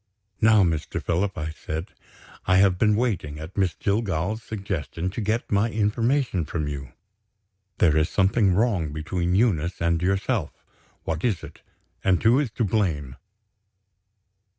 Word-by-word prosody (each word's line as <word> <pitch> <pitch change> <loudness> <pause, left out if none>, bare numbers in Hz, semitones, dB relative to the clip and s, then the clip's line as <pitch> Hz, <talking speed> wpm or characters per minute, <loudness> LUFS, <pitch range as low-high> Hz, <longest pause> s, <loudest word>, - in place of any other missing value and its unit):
"Now, 110 -2 +6
Mr. 80 -4 -1
Philip," 90 +3 -1
I 80 -1 -3
said, 80 +2 -6 0.5
"I 95 - +4
have 95 -2 +4
been 105 -1 +4
waiting, 100 -11 -1
at 80 +4 -9
Miss 95 -4 +1
Jillgall's 100 0 -1
suggestion, 95 -5 -4
to 115 - -4
get 110 +3 -1
my 100 +3 +2
information 115 - +1
from 75 0 -3
you. 70 -3 -6 0.8
There 80 -3 +4
is 80 +1 +2
something 95 0 +2
wrong 100 -8 +1
between 85 +3 -1
Eunice 95 -6 +1
and 85 0 +1
yourself. 95 0 -1 0.4
What 80 0 -3
is 110 -8 0
it? - - -11 0.4
And 95 0 +2
who 115 +5 +5
is 145 -5 0
to 120 - -1
blame?" 85 -11 -1
95 Hz, 145 wpm, -25 LUFS, 80-110 Hz, 0.8 s, Now